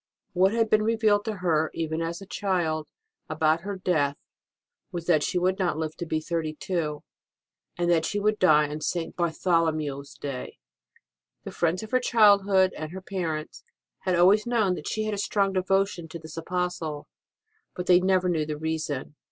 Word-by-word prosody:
What 185 Hz, +2 st, +4 dB
had 225 Hz, 0 st, +2 dB
been 215 Hz, 0 st, +3 dB
revealed 215 Hz, -2 st, +2 dB
to 220 Hz, -2 st, -2 dB
her, 160 Hz, -2 st, +2 dB
even 160 Hz, 0 st, -2 dB
as 170 Hz, +3 st, -4 dB
a -, -, -10 dB
child, 175 Hz, -6 st, -1 dB, 0.4 s
about 155 Hz, +1 st, +2 dB
her 200 Hz, +2 st, -4 dB
death 150 Hz, -6 st, 0 dB, 0.7 s
was 170 Hz, -1 st, -5 dB
that 165 Hz, -4 st, +3 dB
she 180 Hz, -, -1 dB
would 185 Hz, +2 st, +1 dB
not 180 Hz, -5 st, 0 dB
live 155 Hz, -1 st, -3 dB
to 170 Hz, -, -5 dB
be 155 Hz, -, 0 dB
thirty 160 Hz, -1 st, -3 dB
two, 155 Hz, -4 st, -3 dB, 0.7 s
and 175 Hz, 0 st, 0 dB
that 165 Hz, -2 st, +3 dB
she 205 Hz, -, -1 dB
would 210 Hz, +1 st, +1 dB
die 150 Hz, -4 st, +5 dB
on 150 Hz, +1 st, -6 dB
St. 170 Hz, +1 st, -2 dB
Bartholomew 160 Hz, -4 st, 0 dB
s 140 Hz, 0 st, -12 dB
Day. 135 Hz, -3 st, -6 dB, 0.9 s
The -, -, -7 dB
friends 175 Hz, +4 st, 0 dB
of 220 Hz, -, -9 dB
her 255 Hz, -, +4 dB
childhood, 200 Hz, -5 st, +4 dB
and 155 Hz, 0 st, -6 dB
her 190 Hz, +1 st, -7 dB
parents, 165 Hz, -5 st, -4 dB, 0.4 s
had 185 Hz, -1 st, 0 dB
always 195 Hz, +6 st, +5 dB
known 220 Hz, -6 st, +2 dB
that 155 Hz, -, -6 dB
she 215 Hz, -, -1 dB
had 215 Hz, 0 st, -2 dB
a 205 Hz, -, -3 dB
strong 200 Hz, -1 st, +1 dB
devotion 190 Hz, -2 st, 0 dB
to 160 Hz, -, -7 dB
this 160 Hz, -1 st, -11 dB
Apostle, 165 Hz, -3 st, -3 dB, 0.7 s
but 180 Hz, -, -4 dB
they 180 Hz, -1 st, +6 dB
never 185 Hz, 0 st, +2 dB
knew 165 Hz, -3 st, +1 dB
the 150 Hz, -1 st, -3 dB
reason. 155 Hz, -3 st, -3 dB
175 Hz, 185 wpm, -26 LUFS, 155-195 Hz, 0.9 s, they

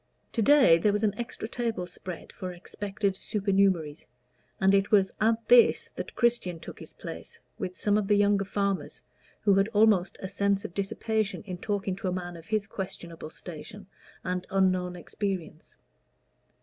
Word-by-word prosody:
To 230 Hz, -, 0 dB
day 260 Hz, -, +6 dB
there 205 Hz, +5 st, +3 dB
was 210 Hz, +1 st, 0 dB
an 210 Hz, -2 st, +2 dB
extra 235 Hz, -1 st, -5 dB
table 230 Hz, -6 st, -2 dB
spread 180 Hz, 0 st, -8 dB
for 185 Hz, -1 st, -5 dB
expected 200 Hz, +3 st, -3 dB
supernumeraries, 190 Hz, -7 st, 0 dB, 0.5 s
and 190 Hz, +1 st, +4 dB
it 200 Hz, 0 st, +3 dB
was 195 Hz, -3 st, +4 dB
at 225 Hz, +1 st, +2 dB
this 480 Hz, -2 st, +5 dB
that -, -, -6 dB
Christian 235 Hz, -8 st, +1 dB
took -, -, -10 dB
his -, -, -9 dB
place -, -, -9 dB, 0.2 s
with 180 Hz, -, -4 dB
some 205 Hz, 0 st, +2 dB
of 200 Hz, -, -2 dB
the 205 Hz, -, +4 dB
younger 200 Hz, -1 st, +3 dB
farmers, 200 Hz, 0 st, -2 dB, 0.4 s
who 205 Hz, -2 st, +4 dB
had 195 Hz, +1 st, +4 dB
almost 210 Hz, -4 st, +3 dB
a 190 Hz, -, -4 dB
sense 200 Hz, +1 st, 0 dB
of 175 Hz, -, -6 dB
dissipation 215 Hz, +2 st, -1 dB
in 185 Hz, -3 st, -6 dB
talking 200 Hz, -2 st, -2 dB
to 195 Hz, -, -4 dB
a -, -, +1 dB
man 175 Hz, -1 st, -4 dB
of 165 Hz, -1 st, -12 dB
his 215 Hz, -2 st, 0 dB
questionable 180 Hz, -5 st, -7 dB
station 180 Hz, +5 st, -9 dB, 0.4 s
and 180 Hz, 0 st, -3 dB
unknown 185 Hz, -2 st, +1 dB
experience. 175 Hz, -3 st, -5 dB
195 Hz, 165 wpm, -28 LUFS, 180-210 Hz, 0.5 s, day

